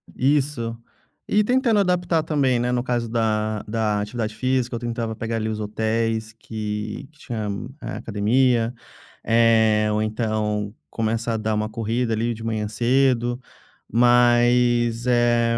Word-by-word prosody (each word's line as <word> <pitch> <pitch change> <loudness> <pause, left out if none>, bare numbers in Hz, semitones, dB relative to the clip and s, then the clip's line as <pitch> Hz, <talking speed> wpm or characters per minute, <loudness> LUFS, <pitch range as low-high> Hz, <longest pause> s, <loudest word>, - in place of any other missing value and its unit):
Isso. 130 -4 0 0.5
E 210 +1 +3
tentando 245 -2 +2
adaptar 180 -4 +1
também, 140 -5 +1
né, 120 +1 0
no 125 -1 0
caso 120 -2 -1
da 110 -2 0
da 105 -1 0
atividade 110 +1 -3
física, 130 -1 0
eu - - -3
tentava 115 -1 -3
pegar 115 +1 -3
ali 110 -1 -1
os 110 - -3
hotéis 110 +1 -1
que 105 0 -5
que 155 - -27
tinham, 110 -3 -4
eh, - - -5
academia, 115 +2 +1 0.5
eh, 110 -2 +4
ou 105 0 0
então 110 -2 -1 0.2
começa 115 +1 -1
a 110 - 0
dar 110 0 -1
uma 110 0 -1
corrida 115 +2 -1
ali 115 +2 0
de 115 0 -9
manhã 110 -2 -2
cedo, 120 +1 +1 0.5
mas, 120 0 +3
eh, 120 -1 +3
115 Hz, 145 wpm, -23 LUFS, 110-120 Hz, 0.5 s, eh